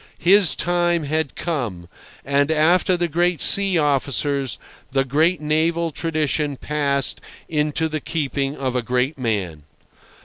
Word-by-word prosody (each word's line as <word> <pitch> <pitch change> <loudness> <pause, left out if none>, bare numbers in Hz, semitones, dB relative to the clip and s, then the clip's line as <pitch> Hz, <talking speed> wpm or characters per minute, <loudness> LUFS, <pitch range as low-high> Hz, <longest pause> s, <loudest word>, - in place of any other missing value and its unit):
His 190 0 +4
time 175 -1 0
had 155 0 -2
come; 120 - -4 0.4
and, 140 +2 +1
after 170 +4 +3
the 175 0 0
great 175 +1 0
sea 195 +2 +5
officers, 140 -2 0 0.3
the 135 0 +1
great 155 +5 +1
naval 160 +2 0
tradition 150 -3 -2
passed 140 -2 0 0.3
into 150 +1 -1
the 155 -1 -4
keeping 140 -3 -3
of 130 -2 -3
a 125 - +1
great 125 +4 -1
man. 100 -10 -2
150 Hz, 130 wpm, -21 LUFS, 135-165 Hz, 0.4 s, sea